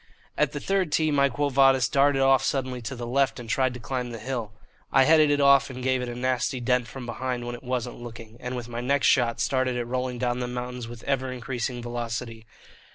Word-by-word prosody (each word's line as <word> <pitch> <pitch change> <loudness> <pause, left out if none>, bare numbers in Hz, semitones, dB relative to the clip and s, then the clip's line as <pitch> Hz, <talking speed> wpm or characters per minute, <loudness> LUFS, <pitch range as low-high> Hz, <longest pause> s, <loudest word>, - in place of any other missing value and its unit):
At - - +1
the - - -4
third 195 -5 0
tee 155 0 +2
my 140 -1 +3
"Quo 145 +3 -1
Vadis" 135 -1 +4
darted 140 -1 +3
off 135 -1 +5
suddenly 130 -2 -1
to 125 +3 -5
the 120 -1 -5
left 135 +2 +1
and 120 - -8
tried 130 +2 +1
to - - -7
climb 125 0 -3
the 115 - -6
hill. 120 -3 -4 0.4
I 135 - +6
headed 155 +1 +5
it 145 0 +2
off 140 -1 +5
and 130 -1 -7
gave 130 0 +1
it 125 - -4
a 120 - -5
nasty 130 +1 -1
dent 125 0 +1
from 130 +3 -8
behind 120 +1 -3
when 120 - -4
it 120 - -8
wasn't 125 -1 -3
looking, 115 -2 -10
and 125 0 -5
with 120 -2 -5
my 120 0 -5
next 140 +2 +1
shot 120 -2 +3
started 130 -2 +1
it 120 -1 -2
rolling 125 +1 -2
down 120 0 -1
the 125 - -2
mountains 125 -1 -5
with 120 -1 -10
ever 130 -2 -1
increasing 125 -1 -4
velocity. 115 -1 -5
125 Hz, 230 wpm, -26 LUFS, 120-135 Hz, 0.4 s, I